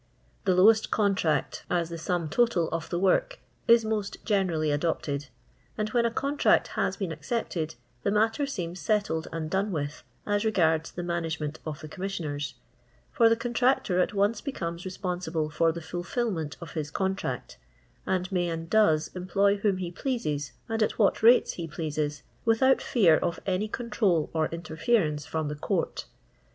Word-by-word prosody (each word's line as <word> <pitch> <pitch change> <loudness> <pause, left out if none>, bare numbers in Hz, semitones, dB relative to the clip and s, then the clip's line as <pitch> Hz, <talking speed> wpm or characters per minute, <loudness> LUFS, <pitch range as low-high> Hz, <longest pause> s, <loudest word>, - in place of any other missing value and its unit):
The 185 -2 +3
lowest 215 +4 +5
contract, 195 -7 +1
as 170 -2 0
the 170 - -5
sum 170 0 -1
total 180 -2 +2
of 165 -1 -3
the 175 - -1
w 190 +2 +4
ork, - - -1 0.3
is 230 -1 +6
most 215 -2 -2
generally 175 -8 +1
adopted, 145 -2 -1 0.5
and 215 0 -1
when 235 +1 +2
a - - -2
contract 280 +4 +2
has - - -1
been 195 -5 -3
accepted, 160 -1 -3 0.3
the - - 0
matter 225 +7 +2
seems 180 -8 -4
•etlled 205 -7 0
and 160 -1 -3
done 195 +5 0
with, 145 -3 -3 0.2
as 205 0 +1
regards 160 -7 +2
the 175 - -5
roana; 170 -1 -1
re 160 0 -2
ment 150 0 -4
of 150 -2 -5
the 155 - -7
Commissioners; 155 -6 -4 0.6
for 230 -3 +5
the 230 - +4
contnictor 240 -6 +2
at - - +1
once 205 +2 +2
becomes 170 - -4
responsible 180 -4 -3
for 165 +2 +3
the 170 +1 -6
fulfilment 175 - -3
of 170 - -8
his 155 -3 -3
contract, 190 -7 -3 0.5
and 185 0 0
may 175 -2 +1
and 165 0 -5
does 160 -8 +4
employ 195 +3 +2
whom 200 -2 +1
he 180 -2 -4
pleases 155 - -2
aud 225 0 -2
at 215 - +1
what 205 -4 +3
rates 235 +3 +6
he 170 -2 -5
j'^easa, 150 -2 -3 0.2
without 245 +4 +4
fear 175 -10 +4
of 170 - -2
any 195 +2 0
control 210 - 0
or 160 -1 +1
interference 165 - 0
from 160 -1 -2
the 150 - -2
Court. 145 - -2
180 Hz, 170 wpm, -28 LUFS, 160-215 Hz, 0.6 s, is